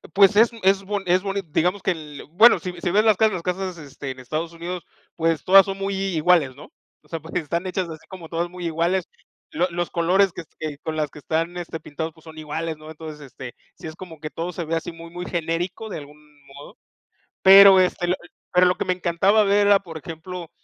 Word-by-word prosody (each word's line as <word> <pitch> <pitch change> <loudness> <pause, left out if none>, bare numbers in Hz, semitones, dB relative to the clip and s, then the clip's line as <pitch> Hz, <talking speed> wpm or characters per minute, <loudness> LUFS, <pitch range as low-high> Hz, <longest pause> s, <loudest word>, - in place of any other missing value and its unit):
Pues 200 +1 +6
es 225 +2 +6
es 195 +1 +3
bon 200 0 -3
es 180 +1 +3
boni 200 0 -2
digamos 180 +6 +1
que 190 - +2
el 150 -4 -7
bueno, 220 +7 +6
si 180 - -5
si 175 - -1
ves 210 +3 +4
las 215 -4 +4
casas 220 -1 +3
las 180 - -3
casas, 180 0 -3
este, 140 -2 -8
en 130 - -10
Estados 155 +6 -4
Unidos, 175 +1 -6 0.3
pues 165 -2 0
todas 195 +1 +7
son 195 0 -4
muy 195 0 -2
i 195 -2 -2
iguales, 155 -5 +3
¿no? 145 - -14 0.3
O - - -25
sea, 165 - -5
pues, 160 +1 -12
están 170 +3 -2
hechas 185 -1 -2
así 160 -1 -10
como 180 -4 -10
todas 170 +1 -2
muy 180 0 -8
iguales, 170 +3 0 0.4
lo 185 - 0
los 175 0 -2
colores 180 +3 +2
que 175 - -8 0.2
que 155 -2 -5
con 160 0 -5
las 150 -2 -2
que - - -12
están, 165 +4 -2
este, 170 -2 -6
pintados, 160 +1 -6
pues 160 - -21
son 160 -1 -13
iguales, 155 +1 -4
¿no? 155 0 -12
Entonces, 155 -1 -9
este, 130 -2 -10 0.2
sí - - -9
es 155 - -8
como 170 -3 -11
que 155 0 -6
todo 170 +3 -4
se 170 - -4
ve 165 +1 -1
así 165 +1 -3
muy 165 0 -11
muy 175 +1 -6
genérico 175 +5 -3
de - - -5
algún 145 +1 -13 0.3
modo, 140 +1 -13 0.7
pero, 195 0 +9
este, 180 -1 +1
l 180 - +2 0.4
pero 180 0 +5
lo 180 - +2
que - - -2
me 185 - +1
encantaba 190 +4 +2
ver 200 +1 +3
era, 200 -1 +6
por 165 -4 -9
ejemplo, 165 +2 -8
175 Hz, 235 wpm, -23 LUFS, 160-190 Hz, 0.7 s, pero